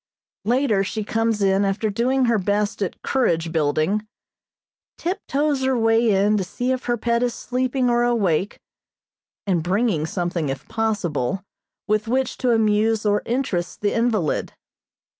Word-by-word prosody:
Later 235 -4 +2
she 215 +2 -3
comes 225 0 0
in 195 0 +3
after 200 +2 0
doing 255 +5 +1
her 230 -3 +2
best 205 +2 -1
at 195 - -3
courage 170 -11 +1
building, 160 +7 0 0.9
tiptoes 295 -5 -1
her 260 -1 +2
way 225 0 +3
in 205 +1 +3
to 195 - 0
see 245 +7 -2
if 255 0 -2
her 240 0 0
pet 235 +1 0
is 245 -1 0
sleeping 255 +1 -1
or 240 0 +2
awake, 205 -7 +1 0.9
and 185 -4 +1
bringing 180 -2 0
something 175 -4 -2
if 135 0 -5
possible, 195 - -1 0.4
with 215 +1 +1
which 260 +2 -1
to 255 - +1
amuse 220 -1 +2
or 205 0 +2
interest 230 -8 -2
the 205 - +1
invalid. 225 -9 0
215 Hz, 145 wpm, -22 LUFS, 195-240 Hz, 0.9 s, in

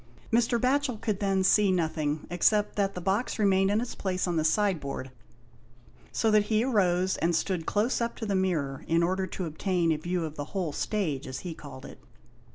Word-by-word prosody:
Mr. 235 0 +3
Batchel 255 -1 +1
could 210 -3 -2
then 195 -2 +1
see 200 +1 +4
nothing, 155 -4 -1
except 205 +4 +2
that 200 -1 0
the 180 - -4
box 195 +7 0
remained 195 -2 +3
in 205 +2 +2
its 240 +1 -4
place 185 -1 -2
on 175 - -1
the 160 - +1
side 190 +2 +2
board, 135 -2 -6 1.0
so 225 - +1
that 210 -1 +4
he 215 +1 +2
arose 185 -7 +2
and 170 0 +1
stood 170 -1 -1
close 220 +5 +1
up 235 0 -1
to 225 - -5
the 205 - -1
mirror 165 -8 -1
in 165 +1 +2
order 185 +2 0
to 185 +1 -4
obtain 170 +1 0
a 155 - +1
view 175 +2 -2
of 155 -1 -7
the 145 - -3
whole 175 -5 -1
stage, 155 -4 -2
as 130 0 -5
he 175 -3 -5
called 140 -4 -11
it. - - -11
185 Hz, 205 wpm, -28 LUFS, 165-210 Hz, 1.0 s, see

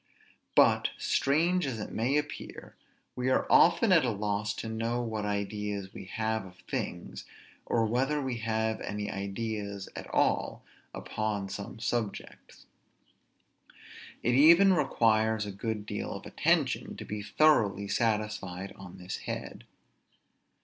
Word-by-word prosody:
But, - - +5
strange 165 +4 +2
as 120 -4 -3
it 105 - -6
may 125 +6 +1
appear, 150 0 -5 0.4
we 125 +1 -1
are 130 - +2
often 190 +5 +6
at 165 -4 +6
a 125 - +1
loss 105 0 -1
to - - -5
know 115 +2 -1
what 110 -2 -3
ideas 100 -1 -3
we - - -8
have 110 +2 -2
of 90 -1 -13
things, - - -4 0.4
or 115 -1 +2
whether 135 +7 +1
we 130 -4 -2
have 110 -1 -1
any 105 0 -4
ideas 100 0 -4
at - - -7
all - - +1 0.3
upon 105 -3 -3
some 100 +3 -6
subjects. 110 -1 -4 1.6
It 120 - +2
even 170 +8 +7
requires 110 - +2
a 100 - -5
good 105 +1 -4
deal - - -4
of - - -8
attention - - 0
to - - -7
be 105 0 -4
thoroughly 105 -6 +3
satisfied 105 -4 -1
on 95 -2 -11
this 90 +1 -5
head. - - -6
110 Hz, 135 wpm, -30 LUFS, 100-120 Hz, 1.6 s, even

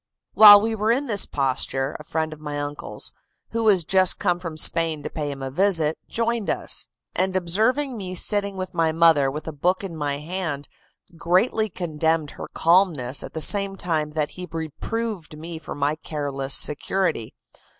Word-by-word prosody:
While 205 -1 +10
we 225 +1 0
were 215 +1 0
in 265 +5 0
this 210 -6 +3
posture, 135 0 -1
a - - -10
friend 160 0 -3
of 155 - -13
my 150 -1 -5
uncle's, 145 0 -5 0.4
who 230 0 -1
was 195 -5 +4
just 185 +3 +3
come 180 -3 0
from 170 -3 -7
Spain 160 -1 +1
to - - -5
pay 150 -2 -4
him 135 -1 -7
a 135 - -4
visit, 165 -2 +2
joined 230 -2 -1
us; - - +1 0.3
and 190 0 0
observing 225 +10 +1
me 185 -2 -6
sitting 200 +1 +1
with 185 -1 -5
my 165 -2 +1
mother 160 -4 +4
with 150 +4 -7
a - - -3
book 180 +7 -1
in 185 -4 -6
my 145 -2 -2
hand, 155 -2 -4 0.5
greatly 215 +6 +1
condemned 160 -3 -1
her - - -8
calmness 165 -7 +2
at - - -9
the 160 - -3
same 200 +2 +2
time 155 -5 -2
that 150 -1 -1
he 180 0 -9
reproved 165 +3 -5
me 165 +1 -8
for 160 - -8
my 145 +1 0
careless 140 -4 -3
security. 155 - 0
165 Hz, 180 wpm, -23 LUFS, 150-195 Hz, 0.5 s, While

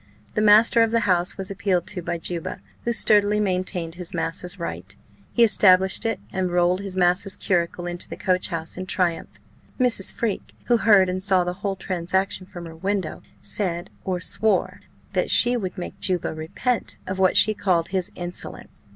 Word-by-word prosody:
The - - 0
master 215 +2 +6
of 225 - +3
the 230 +1 +1
house 180 -3 +1
was 195 0 -5
appealed 190 -3 -1
to 190 -4 -4
by 170 - -3
Juba, 170 0 -5 0.3
who 235 - +1
sturdily 210 -2 +4
maintained 185 -4 -2
his 175 0 -4
massa's 180 +3 -2
right; 95 - -6 0.4
he 235 - +3
established 190 -1 +4
it, 225 - -2
and 185 -1 -1
rolled 175 +1 +2
his 195 -2 -6
massa's 180 +2 +2
curricle 175 -1 -1
into 175 0 -6
the - - -7
coach 185 -2 +1
house 165 -2 -4
in 185 0 -6
triumph. 180 -3 0 0.5
Mrs. 245 -6 +4
Freke, 225 -4 -4
who 240 - +3
heard 205 -4 +5
and 185 +1 -3
saw 190 -2 +3
the 180 0 -3
whole 200 -1 -2
transaction 185 +1 -2
from 175 -2 -9
her 165 -1 -10
window, 190 0 -3 0.2
said, 175 -3 -3
or 185 -2 -2
swore, 215 +4 0 0.3
that - - 0
she 245 0 +5
would 190 -6 -4
make 180 - -7
Juba 185 -4 -1
repent 190 +10 -2
of 190 0 -5
what 185 -1 +3
she 215 - +5
called 180 -5 0
his 185 -2 -2
insolence. 175 - -7
185 Hz, 180 wpm, -23 LUFS, 175-205 Hz, 0.5 s, master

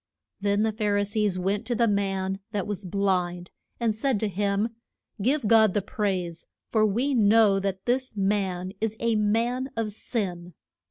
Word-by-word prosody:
Then 205 +1 +1
the 220 - +2
Phar 210 -1 0
i 205 - +2
sees 205 -2 0
went 195 +3 -1
to 245 - 0
the 235 +1 +3
man 195 -2 -1
that 200 -3 -1
was 205 -1 -4
blind, 180 -2 -1 0.3
and 230 -2 +1
said 230 +1 0
to 215 - +1
him, 200 +3 0 0.5
Give 265 +4 +1
God 220 -3 +5
the 205 - +2
praise, 190 -7 -2 0.2
for 220 -2 +2
we 245 +8 0
know 215 -3 +5
that 195 -1 -3
this 255 -2 -1
man 190 -2 0
is 220 0 -1
a 230 -1 +1
man 230 +5 +1
of 220 -2 -1
sin. 180 - -4
205 Hz, 170 wpm, -26 LUFS, 195-225 Hz, 0.5 s, God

